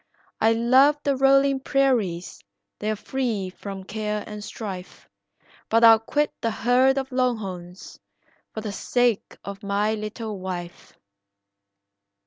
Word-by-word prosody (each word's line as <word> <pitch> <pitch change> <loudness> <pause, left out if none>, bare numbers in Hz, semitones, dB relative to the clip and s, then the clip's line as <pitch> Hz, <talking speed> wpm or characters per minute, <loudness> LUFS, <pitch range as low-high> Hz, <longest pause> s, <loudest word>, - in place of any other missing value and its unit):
I 225 +1 +4
love 260 +6 +4
the 280 -1 +1
rolling 275 +1 +4
prairies, 255 -11 0 0.4
they're 215 +1 -1
free 220 -5 -3
from 195 0 -8
care 210 +1 -3
and 210 -1 -8
strife, 190 -5 -8 0.6
But 230 +1 +3
I'll 225 -1 +9
quit 295 +6 -1
the 230 - 0
herd 250 +4 +3
of 265 -1 -3
longhorns 200 -8 -3 0.5
for 220 - -6
the 210 -1 -4
sake 240 +1 0
of 200 0 -7
my 205 +2 0
little 215 -1 -5
wife." 175 -2 -7
220 Hz, 120 wpm, -24 LUFS, 200-255 Hz, 0.6 s, I'll